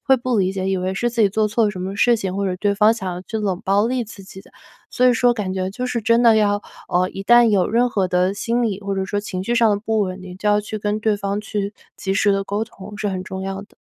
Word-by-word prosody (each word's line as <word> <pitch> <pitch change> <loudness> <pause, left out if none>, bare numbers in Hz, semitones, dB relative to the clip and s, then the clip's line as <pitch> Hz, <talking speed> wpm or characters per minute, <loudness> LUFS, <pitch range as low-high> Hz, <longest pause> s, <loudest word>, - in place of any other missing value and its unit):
会 270 - +5
不 245 -1 -1
理 190 -1 +1
解， 190 0 -2
以 195 - +1
为 185 +1 -2
是 240 +5 0
自 235 -1 0
己 200 - +4
做 215 +1 +1
错 225 +2 +1
了 210 - +2
什 185 - -8
么 190 +2 -4
事 240 +3 +4
情， 190 -2 -4
或 200 0 -1
者 185 - -1
对 200 +1 0
方 210 +2 +5
想 190 -5 -4
要 180 +1 -6
去 220 +3 -4
冷 195 -4 -2
暴 200 +3 +2
力 250 -1 -1
自 205 -2 -12
己 190 0 -12
的。 - - -20 0.4
所 250 - +2
以 245 - +4
说 245 +1 +3
感 200 -5 -3
觉 185 0 -2
就 250 +5 -4
是 235 -2 -2
真 230 +3 +3
的 225 -2 +6
要， 205 -1 +2 0.3
呃， 180 +1 +2
一 195 - -7
旦 240 +1 +6
有 200 -4 +3
任 240 +2 +3
何 195 -5 0
的 180 +2 +1
心 235 +3 -1
理， 205 -4 -1
或 200 0 -2
者 190 0 -2
说 205 +2 -2
情 185 -3 -4
绪 235 +4 -1
上 230 -2 +4
的 205 0 0
不 220 -1 0
稳 185 -1 -2
定， 185 -1 -10
就 210 - -6
要 210 0 +4
去 215 +1 -6
跟 210 +1 -2
对 215 -1 +1
方 200 0 -2
去 205 -1 -3 0.2
及 195 - -2
时 205 +1 +2
地 195 0 -1
沟 205 +2 -2
通， 205 -2 -12
是 210 -1 -1
很 185 -1 -4
重 190 0 -6
要 195 +1 -4
的。 - - -17
205 Hz, 325 characters per minute, -21 LUFS, 190-220 Hz, 0.4 s, 的